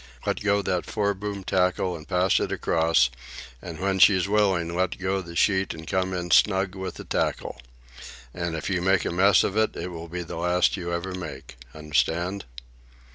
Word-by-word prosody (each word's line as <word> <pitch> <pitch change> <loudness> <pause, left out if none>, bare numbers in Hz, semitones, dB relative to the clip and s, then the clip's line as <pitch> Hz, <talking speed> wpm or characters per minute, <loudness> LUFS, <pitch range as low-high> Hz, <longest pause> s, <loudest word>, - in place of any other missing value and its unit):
"Let - - -1
go 100 0 +1
that 90 -2 -1
foreboom 100 -1 -2
tackle 90 -1 +1
and 80 -3 -10
pass 90 +3 +2
it - - -2
across, 80 -5 +2 0.5
and 85 -3 -8
when 95 0 0
she's 95 -1 +5
willing 95 -5 +1
let 95 +1 0
go 95 +1 -1
the 85 -1 -10
sheet 95 0 +2
and 80 0 -10
come 95 +1 -1
in 90 -1 -4
snug 95 -2 +4
with 95 -2 -6
the - - -8
tackle. - - -2 0.7
And 85 -2 -3
if 80 - -4
you 90 -3 0
make 95 +1 +2
a - - -1
mess 95 +2 +4
of 100 - -2
it, 110 0 +1
it 90 - -5
will 85 0 -7
be 90 +1 -5
the 80 - -7
last 90 +1 +2
you 85 -3 -5
ever 85 +2 -3
make. 70 -7 -8 0.2
Understand?" 80 +6 -1
90 Hz, 185 wpm, -25 LUFS, 85-95 Hz, 0.7 s, she's